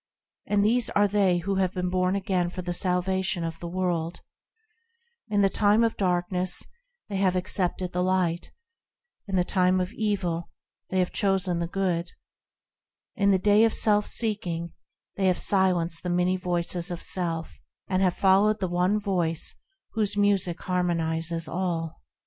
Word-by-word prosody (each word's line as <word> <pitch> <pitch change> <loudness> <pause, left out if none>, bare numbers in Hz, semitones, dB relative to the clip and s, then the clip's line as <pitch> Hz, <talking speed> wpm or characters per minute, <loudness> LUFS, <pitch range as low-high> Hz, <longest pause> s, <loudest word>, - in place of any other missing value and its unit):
And 205 0 +2
these 235 +2 +3
are 205 0 +3
they 195 -3 +2
who 195 +3 -2
have 190 -1 0
been 180 0 -2
born 185 +1 +1
again 185 -3 0
for 180 +1 -6
the 175 0 -3
salvation 185 0 0
of 165 -1 -5
the 170 - -6
world; 175 -2 -2 1.1
In 205 -2 +1
the 195 - +5
time 210 +3 +3
of 230 - +1
darkness, 180 -1 0 0.4
they 200 - -3
have 190 -1 +2
accepted 185 -1 -1
the 180 - -1
Light; 180 -2 0 0.8
In 195 - -3
the 180 - +3
time 185 0 +2
of 185 +4 -3
evil, 185 -6 -2 0.4
they 190 - -2
have 180 -1 +1
chosen 190 -3 +1
the 170 - -2
Good; 180 -2 -2 1.0
In 200 0 +2
the 195 - +5
day 205 +3 +4
of 225 - +3
self 210 -1 +2
seeking, 175 -7 -2 0.4
they 190 -1 +2
have 180 -1 +2
silenced 180 -4 +1
the 180 - -4
many 180 +1 +2
voices 175 -1 -1
of 175 -1 -5
self, 165 -3 -3 0.3
And 185 0 0
have 185 -2 +2
followed 200 +3 +4
the 185 - -1
One 180 +4 +1
Voice 175 -6 -1 0.4
whose 210 -2 -1
music 195 -4 +1
harmonises 165 -2 0
all. 170 -3 -3
185 Hz, 160 wpm, -26 LUFS, 175-195 Hz, 1.1 s, the